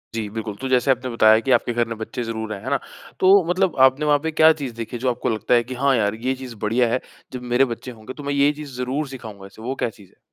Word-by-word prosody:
जी, 110 -2 -2
बिल्कुल। 110 -1 -5
तो 135 - -2
जैसे 130 +1 +3
आपने 130 0 -1
बताया 110 -2 +5
कि 135 - +1
आपके 120 0 +2
घर 120 0 +1
में 115 -1 -5
बच्चे 110 +2 -5
ज़रूर 110 -1 -4
हैं, 100 - -8
है 130 - -4
ना? 140 0 +1 0.4
तो 190 +1 +6
मतलब 180 -1 +1
आपने 135 +3 -2
वहाँ 145 -1 +4
पे 160 - -1
क्या 160 +1 +6
चीज़ 130 -4 -4
देखी 115 +1 -5
जो 130 +2 0
आपको 120 -1 -2
लगता 110 +1 0
है 120 -1 +4
कि 125 +2 -7
हाँ 140 -1 +4
यार 105 -2 +1
ये 130 - +2
चीज़ 130 -3 -9
बढ़िया 120 +3 +2
है। 130 - +1 0.3
जब 125 - -5
मेरे 130 +2 +5
बच्चे 125 +2 -9
होंगे 110 +1 -10
तो 145 - -10
मैं 140 0 -2
ये 140 +1 +4
चीज़ 145 -2 -9
ज़रूर 130 +4 -2
सिखाऊँगा 110 -7 -9
इसे, 100 +3 -14
वो 130 +4 -3
क्या 120 - -1
चीज़ 105 -4 -17
है? - - -30
125 Hz, 285 wpm, -22 LUFS, 115-135 Hz, 0.4 s, तो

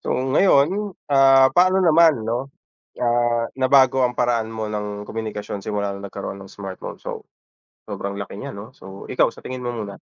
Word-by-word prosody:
So, - - -8
ngayon, 170 +8 +2 0.2
ah, 135 -1 +6
paano 185 +3 +4
naman, 160 -6 +5
'no, 120 +4 -2 0.5
ah, 120 -1 +1 0.2
nabago 130 0 +4
ang 125 - -5
paraan 120 -2 +1
mo 110 -1 -5
ng 105 0 -4
komunikasyon 105 -2 -5
simula 100 -1 -2
nung 100 0 -8
nagkaroon 100 0 -6
ng 95 - -11
smartphone. 95 -2 -8
So, - - -6 0.6
sobrang 100 0 -4
laki 100 0 -7
niyan, 105 - -7
'no? 105 +4 -9
So, 95 0 -11
ikaw - - +3
sa - - -15
tingin 130 -1 -6
mo 120 - -2
muna? 105 -3 -6
120 Hz, 170 wpm, -22 LUFS, 105-135 Hz, 0.6 s, ah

